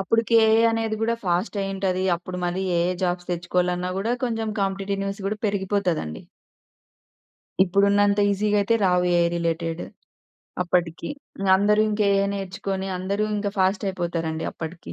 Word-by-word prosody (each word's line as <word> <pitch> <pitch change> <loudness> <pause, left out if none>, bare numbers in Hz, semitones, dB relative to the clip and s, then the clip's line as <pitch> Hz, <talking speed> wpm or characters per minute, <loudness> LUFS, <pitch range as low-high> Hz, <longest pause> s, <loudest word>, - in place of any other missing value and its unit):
అప్పటికే 230 +4 +2
ఏఐ 220 +1 +5
అనేది 225 -1 -1
కూడా 230 +1 +2
ఫాస్టయ్యి 195 +2 -1
ఉంటది. 190 -1 0
అప్పుడు 180 +1 -7
మళ్ళీ 185 +2 -2
ఎఐ 175 +1 +2
జాబ్స్ 175 0 -2
తెచ్చుకోవాలన్నా 180 +1 -1
కూడా 225 +4 0
కొంచెం 225 -2 -2
కాంపిటేటివ్ 195 0 -1
న్యూస్ 195 0 -4
గూడా 215 +2 -2
పెరిగిపోతుందండి. 190 - -1 1.4
ఇప్పుడున్నంత 200 +2 +3
ఈజీగా 210 +1 +1
అయితే 230 +3 +2
రావు 180 -1 +3
ఏఐ 170 - +4
రిలేటెడ్ 165 0 -2 0.8
అప్పటికి. 175 -2 -1 0.3
ఇంగ 195 0 -1
అందరూ 210 +2 +3
ఇంకా 210 0 +1
ఏఐ 195 0 +2
నేర్చుకొని, 195 0 -4
అందరూ 200 +3 -1
ఇంకా 205 0 -1
ఫాస్టయిపోతారండి 175 -4 -1
అప్పటికి. 165 +1 -8
195 Hz, 135 wpm, -24 LUFS, 175-205 Hz, 1.4 s, ఏఐ